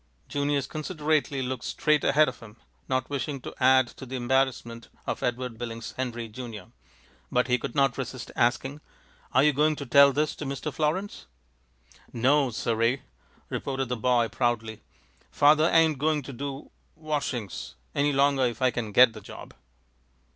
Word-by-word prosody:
Junius 145 -1 0
considerately 155 -2 -1
looked 125 -3 -4
straight 150 -1 +1
ahead 150 +2 +4
of - - -5
him, 115 0 -14 0.3
not 130 -1 0
wishing 140 0 -3
to - - -8
add 130 0 +5
to 130 - -11
the 130 - -5
embarrassment 120 -2 -1 0.2
of - - -3
Edward 125 -2 -3
Billings 115 -1 -6
Henry, 120 -3 -4
Junior, 110 -2 -9 0.6
but 125 +1 +2
he 125 -1 +2
could 120 - -6
not 135 -2 +2
resist 130 -1 -6
asking, 135 +4 0 0.5
"Are 130 - +4
you 150 0 +4
going 150 +3 +2
to 140 - -6
tell 140 +2 +7
this 150 +2 0
to 150 - -5
Mr. 140 +2 -4
Florins?" 160 +8 -2 0.8
"No 135 +3 +3
sir 115 0 -2
ee!" 125 +3 +2 0.5
responded 135 -2 -3
the 125 - 0
boy, 120 0 +2
proudly. 115 -3 -2 0.5
"Father 155 +3 +4
ain't 160 -4 +4
going 150 0 +1
to 135 - -8
do 140 +2 -6 0.2
washings 145 - -4 0.2
any 145 +1 +2
longer 140 -1 +3
if 120 -2 -5
I 130 -1 +3
can 115 -3 -4
get 120 +2 +6
the 110 - -10
job." - - -11
130 Hz, 160 wpm, -27 LUFS, 120-145 Hz, 0.8 s, tell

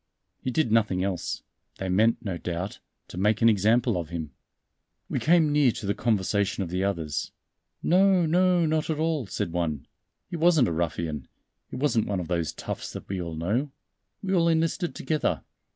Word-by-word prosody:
He - - -2
did 130 -2 +1
nothing 105 -5 +2
else; 95 -3 -3 0.3
they 95 - -4
meant, 110 +6 +2
no 90 -4 -3
doubt, 90 +3 -4 0.3
to 90 - -7
make 105 +3 +2
an 115 - +8
example 110 +1 +3
of 85 -3 -4
him." 80 -4 -5 0.8
We - - -1
came 160 -2 +4
near 145 -4 +4
to - - -6
the 100 - +1
conversation 100 -2 0
of 85 - -6
the 90 +1 0
others. 80 -6 -2 0.5
"No, 185 0 +4
no, 180 +1 +3
not 155 0 0
at 155 - 0
all," 155 -6 0
said 85 - -3
one. 80 -5 -2 0.4
"He 170 - -5
wasn't 160 -6 +4
a - - -1
ruffian, 80 -4 -2 0.4
he - - -7
wasn't 130 -4 +1
one 100 -2 -1
of 85 - -5
those 85 -5 0
toughs - - -6
that - - -8
we 95 -2 -2
all 85 -2 -5
know. 105 - -1 0.5
We 190 0 -1
all 170 -2 +4
enlisted 165 +2 +1
together. 155 -1 -1
105 Hz, 185 wpm, -26 LUFS, -, 0.8 s, an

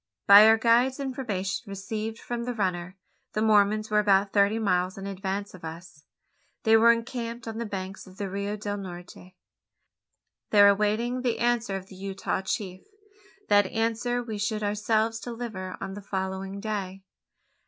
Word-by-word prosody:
By 205 +2 +10
our 220 0 +6
guide's 240 +4 +3
information 230 -8 -3
received 215 +3 -4
from 235 0 -5
the 245 -1 -3
runner 185 -3 -2 0.4
the 215 - -1
Mormons 215 0 +3
were 210 - +4
about 200 -1 +3
thirty 200 +1 +3
miles 185 -3 0
in 195 - -7
advance 200 +1 -4
of 185 - -13
us. 160 -2 -10 0.6
They 220 0 +5
were 230 +1 +7
encamped 235 0 -4
on 225 0 -5
the 235 - -3
banks 195 -1 -6
of 185 0 -15
the 200 - -3
Rio 200 +2 -3
del 205 0 -4
Norte, 180 -1 -10 1.1
there 205 -1 +7
awaiting 215 +5 +1
the 245 -2 0
answer 235 -4 0
of 190 -1 -5
the 190 - -14
Utah 195 0 -3
chief. 190 -1 -4 0.7
That 205 -1 +4
answer 230 +3 -1
we 220 -3 -5
should 215 +1 -1
ourselves 215 +2 0
deliver 225 -6 -6
on 190 - -5
the 205 - -8
following 190 0 -4
day. 195 -3 -4
205 Hz, 160 wpm, -27 LUFS, 195-225 Hz, 1.1 s, By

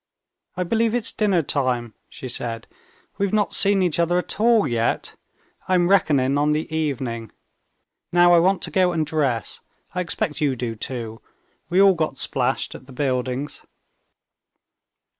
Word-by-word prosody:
"I 180 - 0
believe 225 +5 +1
it's 240 -2 0
dinner 195 -6 +1
time," 125 -5 -1 0.2
she 150 -6 -8
said. 115 -2 -5 0.5
"We've 200 -1 0
not 210 -2 +1
seen 200 -1 +4
each 170 -2 0
other 170 +1 +2
at 180 - -4
all 230 -1 +4
yet. 115 -1 -1 0.5
I 185 - +2
am 175 -1 +2
reckoning 145 -7 +3
on 150 +1 +2
the 155 +1 -3
evening. 130 -7 -3 0.8
Now 175 0 +5
I 170 - +7
want 185 +3 +2
to - - -3
go 185 -3 +2
and 160 -2 0
dress. 140 -8 -1 0.3
I 180 - -1
expect 155 -3 -3
you 140 -3 +1
do 115 -2 -4
too; 115 -1 -6 0.5
we 180 - +2
all 195 -1 +7
got 155 -5 -2
splashed 130 0 0
at 130 - -12
the 135 - -12
buildings." 130 +1 -2
155 Hz, 160 wpm, -22 LUFS, 130-180 Hz, 0.8 s, I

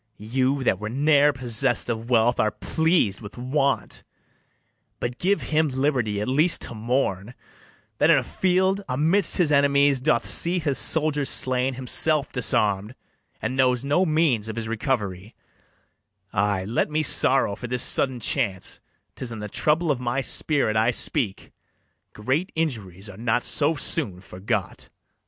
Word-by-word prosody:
You, 130 +5 -1
that 95 - +1
Were 105 +1 -5
ne'er 145 +3 +3
possess'd 120 -3 +1
of 115 0 -4
wealth, 120 0 +2
are 110 - +3
pleas'd 120 - 0
with 105 +1 -11
want; 135 +3 -1 1.0
But 120 +1 -4
give 200 +3 +1
him 155 +1 +3
liberty 130 -6 -1
at 105 - -3
least 150 +7 +3
to - - -5
mourn, 115 -2 -2 0.6
That - - +4
in - - +6
a - - 0
field, 190 +2 0
amidst 160 +9 +2
his 170 -5 +2
enemies, 140 -1 +3
Doth 150 +5 +1
see 175 +2 -1
his 150 -5 0
soldiers 150 -3 +1
slain, 130 0 0
himself 140 +3 +2
disarm'd, 105 -2 0 0.5
And 130 - -2
knows 130 -1 +2
no 145 +6 +2
means 155 - +1
of 110 - -5
his 115 -1 -4
recovery: 105 -4 -3 1.0
Ay, 100 -1 0
let 115 +8 -1
me 155 +1 0
sorrow 130 -6 +1
for 125 - -7
this 125 +1 -2
sudden 130 -2 +1
chance; 105 -7 -1 0.4
'Tis 125 - -5
in 115 - -6
the 105 0 -6
trouble 155 +8 +1
of 135 - -1
my 125 +2 -1
spirit 140 -4 0
I 110 +2 +3
speak: 125 -3 -1 0.6
Great 135 - -2
injuries 110 - -3
are 100 -1 -11
not 120 +1 0
so 155 +2 +1
soon 95 -8 -2
forgot. 100 +1 -5
130 Hz, 150 wpm, -24 LUFS, 110-150 Hz, 1.0 s, in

